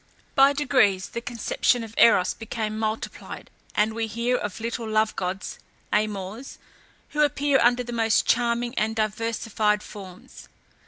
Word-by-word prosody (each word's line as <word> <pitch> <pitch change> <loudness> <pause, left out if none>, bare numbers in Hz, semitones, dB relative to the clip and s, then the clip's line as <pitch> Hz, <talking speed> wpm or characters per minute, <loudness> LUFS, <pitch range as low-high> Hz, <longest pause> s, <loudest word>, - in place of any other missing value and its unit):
By 275 +1 +6
degrees 245 -10 +2
the 235 - -5
conception 240 0 0
of 225 -1 -9
Eros 185 -6 +5
became 220 -1 -4
multiplied 220 0 -5 0.2
and 215 +1 +2
we 225 0 -2
hear 235 +3 0
of 210 -4 -4
little 230 0 -4
love 215 0 +1
gods 190 +1 -4 0.3
(Amors), 210 +3 -2 0.5
who 300 - -1
appear 285 -1 +2
under 245 +1 +3
the 240 0 -7
most 225 -1 +2
charming 240 0 +1
and 220 +1 0
diversified 215 -1 0
forms. 190 -3 -12
225 Hz, 140 wpm, -25 LUFS, 215-240 Hz, 0.5 s, By